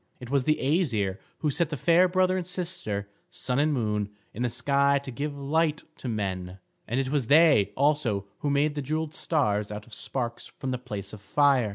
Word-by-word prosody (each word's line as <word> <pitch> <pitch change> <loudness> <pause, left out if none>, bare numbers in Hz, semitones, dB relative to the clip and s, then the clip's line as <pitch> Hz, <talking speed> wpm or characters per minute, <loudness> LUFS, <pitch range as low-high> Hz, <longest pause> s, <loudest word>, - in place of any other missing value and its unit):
It 125 0 -9
was 140 -2 +2
the 155 - +3
Æsir 120 - +1 0.2
who 150 - +1
set 165 +2 +1
the 150 - -3
fair 170 +7 +5
brother 185 0 +2
and 180 -2 -2
sister, 175 - -3 0.2
Sun 125 +1 -1
and 150 +1 +3
Moon, 105 -6 0 0.2
in 115 - -6
the 125 - +1
sky 140 +3 +2
to 140 -1 -6
give 145 +4 -4
light 150 +2 +1
to - - -7
men; 95 -5 -3 0.3
and 120 +4 0
it 135 -1 -1
was 140 -5 0
they 150 -8 +6
also 135 -8 +1
who 145 - -1
made 145 +1 +2
the 145 - -3
jewelled 155 +3 -2
stars 105 -12 0
out 105 0 -6
of 120 - -15
sparks 120 -3 -3
from 130 - -3
the 125 - -2
place 105 -5 -6
of 105 - -9
fire. 135 +1 +3
140 Hz, 205 wpm, -27 LUFS, 110-150 Hz, 0.3 s, they